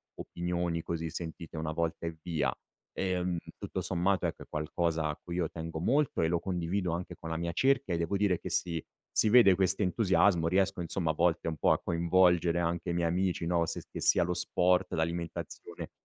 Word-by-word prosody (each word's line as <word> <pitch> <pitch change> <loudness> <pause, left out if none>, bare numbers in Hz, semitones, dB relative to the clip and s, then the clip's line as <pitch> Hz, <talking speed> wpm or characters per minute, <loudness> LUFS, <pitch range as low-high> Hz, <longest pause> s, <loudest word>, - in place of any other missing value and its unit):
opinioni 85 -1 -2
così 80 -1 -4
sentite 85 -1 -7
1 80 0 -2
volta 85 +1 -2
e 80 -1 -6
via. 75 -7 0 0.4
Ehm, 90 -2 -1 0.2
tutto - - -5
sommato 90 +2 0
ecco - - -3
è - - -17
qualcosa 80 +1 -1
a 75 - -2
cui 85 -1 -6
io 85 -3 0
tengo 80 -1 -6
molto 135 - +1
e 80 - +3
lo 85 +1 +1
condivido 90 0 -2
anche 90 +1 -4
con 80 - -8
la 80 - -2
mia 85 0 -2
cerchia 135 -3 +2
e - - +1
devo 85 +4 -1
dire 95 -4 +2
che - - -6
si 85 -3 -1 0.3
si 110 - +3
vede 115 -4 +7
questo 95 +1 +1
entusiasmo, 95 -3 +3
riesco 95 0 +1
insomma 85 -1 0
a - - -4
volte 85 +1 +1
un 80 - -1
po' - - +3
a - - +3
coinvolgere 85 0 +3
anche 85 +1 -1
i - - -1
miei 85 -1 +1
amici, 90 0 0
no, 85 -1 +2
se - - -4
che - - -6
sia - - +4
lo 90 +1 -1
sport, 90 +1 +2
l'alimentazione 85 +1 -4
85 Hz, 200 wpm, -30 LUFS, 85-90 Hz, 0.4 s, vede